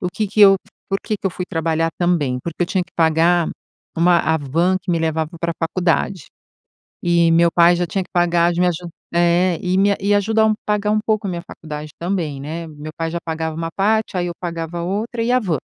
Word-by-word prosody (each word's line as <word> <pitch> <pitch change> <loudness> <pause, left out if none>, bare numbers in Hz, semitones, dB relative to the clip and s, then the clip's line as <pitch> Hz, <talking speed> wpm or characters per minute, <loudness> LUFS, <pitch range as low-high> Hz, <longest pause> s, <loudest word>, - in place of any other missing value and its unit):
o 180 - -1
que 215 - -1
que 210 +2 -1
eu 195 -1 +8 0.3
por 195 0 0
que 215 - -2
que 195 - -4
eu 190 - 0
fui 180 - -5
trabalhar 165 -1 0
também, 160 -8 +1
porque 170 +1 -3
eu - - 0
tinha 185 0 0
que - - -29
pagar, 165 +1 +3 0.5
uma 170 +1 +4
a 160 0 +1
van 165 +6 +1
que 185 - -28
me 170 - +1
levava 160 -1 -1
pra 170 0 -1
faculdade. 175 0 0 0.8
E, 170 -1 +3
meu 170 +1 +4
pai 175 0 +5
já 175 0 -1
tinha 190 +3 -2
que - - -24
pagar, 175 -1 +3
de 175 - -2
me 180 - +4
aju 175 0 -4 0.3
é. 175 0 +3
E 180 0 0
me 200 +1 +3
e 200 +1 +2
ajuda 220 +2 +2
a - - +5
um 215 - +3
pagar 210 0 0
um 215 - +2
pouco 215 -1 0
a 190 - -2
minha 170 -1 -4
faculdade 150 -1 -8
também, 170 -6 -2
né? 160 +4 -5
Meu 155 0 -9
pai 165 0 -2
já 170 - -2
pagava 160 -1 -3
uma 165 0 -3
parte, 215 0 +1
aí 175 - 0
eu 175 - -4
pagava 170 -1 -4
outra 215 +6 -2
e 240 - +1
a 255 - +4
van. 175 - -1
175 Hz, 235 wpm, -20 LUFS, 165-195 Hz, 0.8 s, eu